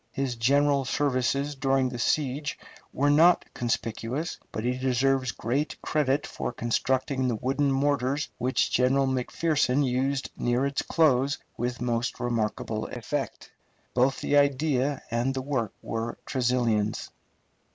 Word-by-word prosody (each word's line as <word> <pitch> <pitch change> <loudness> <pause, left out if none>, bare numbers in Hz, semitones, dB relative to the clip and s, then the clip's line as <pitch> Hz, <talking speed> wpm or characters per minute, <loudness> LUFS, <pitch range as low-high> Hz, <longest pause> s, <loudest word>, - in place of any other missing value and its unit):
His 135 -3 -2
general 140 +4 +3
services 140 +1 0
during 135 -1 +1
the 120 -1 -6
siege 145 +3 0 0.3
were 145 +2 +2
not 170 +4 +5
conspicuous, 120 +6 -2
but 110 - -4
he 125 +1 0
deserves 130 0 +1
great 135 +8 -2
credit 145 -1 +1
for - - -4
constructing 130 +3 0
the 120 - 0
wooden 135 +5 0
mortars 140 +1 +1
which 125 +1 +1
General 135 +2 +3
McPherson 135 +1 +1
used 135 +2 -1
near 120 +2 +1
its 140 0 -1
close 140 -4 +2 0.2
with 125 +1 -3
most 120 0 -1
remarkable 110 -2 -2
effect. - - -4 0.4
Both 130 +2 +2
the 145 - +2
idea 140 -1 +2
and 120 +3 0
the 130 - -2
work 130 -7 -1
were 115 +1 -3
Tresilian's. 120 -5 0
130 Hz, 130 wpm, -27 LUFS, 120-140 Hz, 0.4 s, not